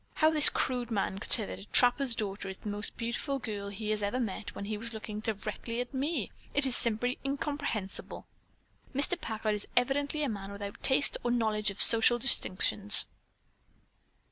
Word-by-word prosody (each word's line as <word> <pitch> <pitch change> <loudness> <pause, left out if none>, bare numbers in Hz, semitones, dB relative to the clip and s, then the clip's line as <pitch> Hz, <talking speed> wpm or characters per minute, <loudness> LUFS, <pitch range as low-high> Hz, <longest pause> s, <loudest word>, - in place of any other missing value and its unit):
"How 315 0 +3
this 305 -2 +8
crude 245 -2 -1
man 195 -3 -2
could - - -6
say - - +6
that 95 0 -8
a 95 - -11
trapper's 245 - +5
daughter 200 -2 -4
is 190 - -7
the 210 - -7
most 205 +1 -5
beautiful 240 +4 -3
girl 205 -5 -6
he 210 +1 -4
has 215 -1 -1
ever 205 +5 -2
met 215 -3 -5
when 200 - -6
he 215 +1 -3
was 225 +2 -5
looking 215 -1 -6
directly 220 +2 -4
at 245 +2 -5
me, 285 +5 -2 0.2
is 270 -3 +4
simply 240 +2 +1
incomprehensible. 275 -7 -4 0.7
Mr. 320 +6 +1
Packard 220 -1 -2
is 210 -1 -6
evidently 285 +4 +1
a - - 0
man 200 -2 -6
without 200 0 -8
taste 270 +1 +2
or 240 - -1
knowledge 215 -3 0
of 200 - -8
social 230 +1 +5
distinctions." 205 -4 +3
225 Hz, 175 wpm, -30 LUFS, 205-260 Hz, 0.7 s, this